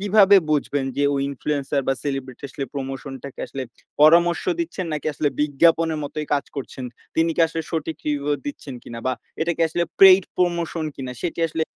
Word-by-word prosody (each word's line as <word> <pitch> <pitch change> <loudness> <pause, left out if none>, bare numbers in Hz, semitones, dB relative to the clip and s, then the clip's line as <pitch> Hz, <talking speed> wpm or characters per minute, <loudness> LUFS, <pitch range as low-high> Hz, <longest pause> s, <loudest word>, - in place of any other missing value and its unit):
কিভাবে 200 0 +6
বুঝবেন 145 -2 0
যে, 145 - +1
ওই 135 - 0
ইনফ্লুয়েন্সার 140 0 -1
বা 135 - +4
সেলিব্রিটি 135 -2 -4
আসলে 135 - -5
প্রমোশন 135 0 -5
টাকে 140 - -8
আসলে 135 - -5 0.4
পরামর্শ 170 +3 +6 0.2
দিচ্ছেন 215 - -3
নাকি 150 0 -3
আসলে 145 - +1
বিজ্ঞাপনের 160 +2 +3
মতোই 150 +1 -5
কাজ 140 - -1
করছেন? 130 -1 -6 0.3
তিনি 165 +1 +2
কি - - +1
আসলে 165 0 -3
সঠিক 160 -1 -3
রিভিউ 145 0 0
দিচ্ছেন 150 - -6
কিনা? 115 0 -8
বা 130 - +2 0.3
এটাকে 170 +1 -1
আসলে 170 +2 -1 0.2
পেইড 190 0 +9
প্রমোশন 170 -2 0
কিনা 130 -2 -5
সেটি 170 -1 -3
আসলে 160 +1 -2
150 Hz, 175 wpm, -23 LUFS, 140-170 Hz, 0.4 s, পেইড